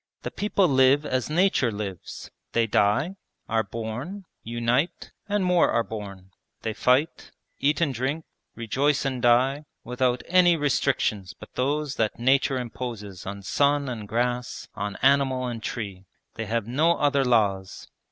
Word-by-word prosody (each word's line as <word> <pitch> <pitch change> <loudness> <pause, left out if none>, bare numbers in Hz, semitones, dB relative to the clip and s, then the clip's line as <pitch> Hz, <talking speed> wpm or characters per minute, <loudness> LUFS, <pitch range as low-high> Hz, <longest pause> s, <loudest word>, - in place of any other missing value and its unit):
'The - - -4
people 200 -2 +1
live 135 +1 +4
as 130 -1 -1
nature 160 -7 +2
lives: 100 -3 -7 0.2
they 115 -1 +3
die, 115 - +1 0.3
are 115 0 +1
born, 115 - -6 0.2
unite, 120 +8 -1 0.2
and 205 -2 +1
more 180 -1 +4
are 115 - +2
born 100 -4 -8 0.3
they 110 - -2
fight, 130 +8 +1 0.3
eat 140 +1 +2
and 150 -5 +1
drink, 135 +6 -2 0.3
rejoice 135 +6 0
and 130 -2 -2
die, 130 +4 +3 0.2
without 125 0 0
any 175 -1 +5
restrictions 130 - 0
but - - -12
those 145 +2 -1
that 110 -2 0
nature 130 +2 +2
imposes 115 -6 -6
on 100 0 -6
sun 140 +7 +2
and 110 -5 -5
grass, 120 +2 -2
on 105 -1 -4
animal 135 -1 +3
and 120 -2 -4
tree. 100 -4 -5 0.3
They 110 -1 -5
have 115 -1 -1
no 155 +8 +3
other 140 -1 +2
laws.' 100 -6 0
125 Hz, 145 wpm, -25 LUFS, 110-140 Hz, 0.3 s, any